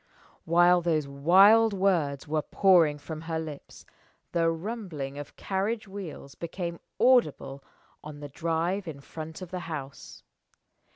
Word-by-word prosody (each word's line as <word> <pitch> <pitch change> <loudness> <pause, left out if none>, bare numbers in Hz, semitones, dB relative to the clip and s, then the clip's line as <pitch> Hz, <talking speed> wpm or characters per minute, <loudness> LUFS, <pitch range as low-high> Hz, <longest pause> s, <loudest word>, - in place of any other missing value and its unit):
While 175 +2 +5
those 160 -4 0
wild 195 +10 +5
words 170 -8 0
were 155 +1 0
pouring 170 -5 +4
from 155 +2 -8
her 160 0 -3
lips, 155 -3 -8 0.5
the 165 -1 +2
rumbling 165 - -5
of 145 - -9
carriage 205 +3 -2
wheels 185 -8 -8
became 170 0 -5 0.2
audible 150 - +2 0.4
on 150 -1 -9
the 145 -1 -8
drive 170 +6 -2
in 150 -3 -7
front 160 +4 -8
of 180 - -10
the 185 - -3
house. 140 -3 -8
165 Hz, 130 wpm, -28 LUFS, 150-190 Hz, 0.5 s, While